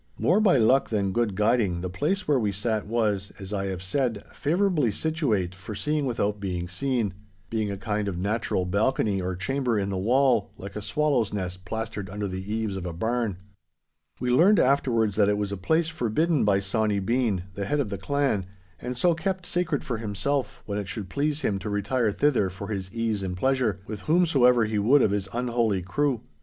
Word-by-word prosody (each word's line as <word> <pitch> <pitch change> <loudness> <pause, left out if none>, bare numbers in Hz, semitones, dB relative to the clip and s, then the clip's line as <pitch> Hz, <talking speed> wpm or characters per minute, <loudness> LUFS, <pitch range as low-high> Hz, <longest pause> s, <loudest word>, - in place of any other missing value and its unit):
More 185 +5 +3
by 195 -9 +5
luck 130 +4 +4
than 100 -3 0
good 110 -1 0
guiding, 105 -4 +2
the 90 - -2
place 155 - -1
where 145 -3 +3
we 105 -3 0
sat 105 +1 -1
was, 105 -3 0
as 95 +1 -6
I 100 -1 -1
have 95 -1 -4
said, 115 +1 -1
favourably 165 - +1
situate 115 - -1
for 95 +3 -8
seeing 150 +5 0
without 105 -4 -1
being 90 -3 -3
seen—being 105 -2 -3
a 100 - -3
kind 105 0 -2
of 95 -3 -3
natural 100 -1 -1
balcony 100 +1 +1
or 90 0 -2
chamber 125 +4 -1
in 100 -1 -1
the 95 - -2
wall, 120 0 +3
like 100 +1 -9
a 105 - -4
swallow's 135 -2 +1
nest 95 -2 -4
plastered 110 -1 -4
under 105 +1 -3
the 95 +2 -5
eaves 110 -3 -1
of 90 -1 -4
a 85 - -4
barn. 110 +2 -1 0.8
We 125 0 0
learned 185 +11 +6
afterwards 115 -6 +2
that 105 -2 +4
it 105 - +2
was 105 -1 -2
a - - -2
place 160 - +1
forbidden 155 +1 +1
by 100 -1 +3
Sawny 105 +1 0
Bean, 110 -2 0
the 100 +1 -4
head 145 +8 0
of 130 -7 0
the 100 -2 -4
clan, 130 -4 0 0.3
and 125 0 -5
so 175 +6 +3
kept 185 +2 -2
sacred 175 -5 -1
for 120 -4 -3
himself 115 +6 -2
when 100 0 -2
it 100 - -5
should 95 0 -5
please 145 - -1
him 100 -7 0
to 105 +2 -5
retire 105 +3 0
thither 125 -5 +2
for 100 +3 -8
his 95 -3 -4
ease 115 -3 -1
and 90 -1 -3
pleasure, 125 -4 +1
with 105 -2 -6
whomsoever 135 -8 +4
he 105 -1 -1
would 130 +7 +5
of 100 - +3
his 100 -1 -2
unholy 115 -5 0
crew. 130 +5 0
110 Hz, 200 wpm, -26 LUFS, 100-130 Hz, 0.8 s, learned